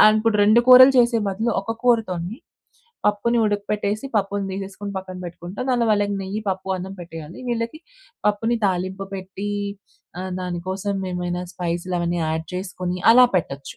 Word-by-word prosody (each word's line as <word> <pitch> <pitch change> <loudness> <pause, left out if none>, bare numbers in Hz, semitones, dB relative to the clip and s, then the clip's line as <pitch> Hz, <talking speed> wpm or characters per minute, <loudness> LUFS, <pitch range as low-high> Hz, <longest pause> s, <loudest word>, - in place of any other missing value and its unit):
అనుకుంటారు 215 0 +2
2 215 +3 +6
కూరలు 255 +1 +10
చేసే 240 -1 +4
బదులు 220 +5 -1
ఒక 220 +3 -3
కూరతోని 220 -4 +1 0.7
పప్పుని 210 +3 +2
ఉడకపెట్టేసి, 205 +1 -1
పప్పుని 200 0 0
తీసేసుకొని 200 +1 -6
పక్కన 185 -1 -8
పెట్టుకుంటా. 175 +2 -8
అందులో 240 -2 +2
వాళ్ళకి 205 -1 +2
నెయ్యి 195 +3 -4
పప్పు 190 0 -4
అన్నం 190 +1 -6
పెట్టేయాలి. 165 -1 -9
వీళ్ళకి 230 +4 -2 0.5
పప్పుని 225 +3 0
తాలింపు 190 +1 -2
పెట్టి 190 +1 -6 0.7
ఆహ్, 185 0 -4
దానికోసం 185 +3 -3 0.2
ఏమైనా 180 0 -2
స్పైస్‌లు 175 +1 -2
అవన్నీ 170 0 -1
యాడ్ 160 +1 -2
చేసుకొని 180 -1 -4
అలా 250 +1 +8
పెట్టొచ్చు. 140 -5 -4
195 Hz, 140 wpm, -22 LUFS, 180-215 Hz, 0.7 s, కూరలు